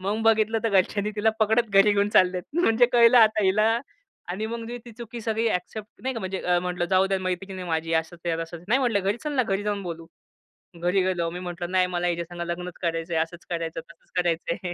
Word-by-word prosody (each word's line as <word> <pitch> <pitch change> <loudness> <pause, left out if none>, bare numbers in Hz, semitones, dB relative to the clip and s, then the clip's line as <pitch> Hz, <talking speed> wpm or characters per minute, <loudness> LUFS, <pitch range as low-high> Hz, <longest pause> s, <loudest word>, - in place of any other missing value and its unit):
मग 205 +4 -2
बघितलं 225 0 +3
तर - - +3
घरच्यांनी 200 +1 +1
तिला 220 +1 +3
पकडत 220 +2 +3
घरी 195 +1 +5
घेऊन 205 0 +2
चाललेत. 180 -2 +3 0.2
म्हणजे 230 -1 +4
कळलं 235 0 +7
आता 220 -2 +5
हिला 215 +4 +3 0.5
आणि 205 +5 -3
मग 235 +1 -4
मी 240 +1 -6
ती 235 - -11
चुकी 235 +1 -8
सगळी 225 +1 0
ॲक्सेप्ट 210 +3 -4
नाही 260 0 -2
का, 230 - -4
म्हणजे 190 0 -4 0.2
म्हंटलं, 180 -1 -2
"जाऊ 190 +1 +3
द्या, 195 0 0
मैत्रीण 185 +1 -4
आहे 180 - -6
माझी, 165 0 -1
असंच 170 +2 -15
आहे, 165 - +1
तसच." 165 +1 -9
नाही 245 +5 +4
म्हटलं, 235 -6 +1
"घरी 200 +3 0
चल 300 - -2
ना, 260 -3 +2
घरी 195 -2 -1
जाऊन 205 -1 -2
बोलू." 165 -2 -6 0.8
घरी 180 +2 +2
गेलो. 175 -3 0
मी 175 +2 -6
म्हटलं, 175 -1 -5
"नाही, 185 -1 +3
मला 175 -1 -1
हिच्यासंगं 170 0 -3
लग्नच 175 +1 -4
करायचंय, 165 -1 -1
आसंच 165 +2 -3
करायचं, 165 -1 -3
तसंच 170 - -20
करायचंय." 175 0 -1
190 Hz, 215 wpm, -25 LUFS, 175-220 Hz, 0.8 s, कळलं